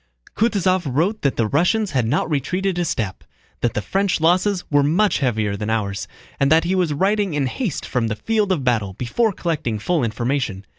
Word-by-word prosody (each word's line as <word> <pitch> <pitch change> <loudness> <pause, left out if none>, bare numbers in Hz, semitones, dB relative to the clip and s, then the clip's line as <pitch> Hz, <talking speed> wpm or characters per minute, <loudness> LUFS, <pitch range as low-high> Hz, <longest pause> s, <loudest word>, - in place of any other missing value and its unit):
Kutúzov 195 -5 +2
wrote 180 - 0
that 140 - +1
the 115 - +1
Russians 180 - +1
had 125 -5 +1
not 145 +7 +1
retreated 175 +5 -1
a 175 - +1
step, 105 - -3 0.4
that 120 - -1
the 105 - -1
French 195 - 0
losses 180 +4 +2
were 145 0 +5
much 175 +9 +2
heavier 110 -7 0
than 105 +2 -4
ours, 105 -2 -2 0.3
and 140 +1 +2
that 160 +1 +5
he 175 +2 0
was 180 -4 +1
writing 195 +3 +1
in 145 -2 +1
haste 175 - -3
from 120 -3 -1
the 110 - -2
field 215 - 0
of 160 -7 0
battle 110 -6 0
before 170 - 0
collecting 155 - -2
full 155 +7 0
information. 115 -3 -2
150 Hz, 195 wpm, -21 LUFS, 115-185 Hz, 0.4 s, were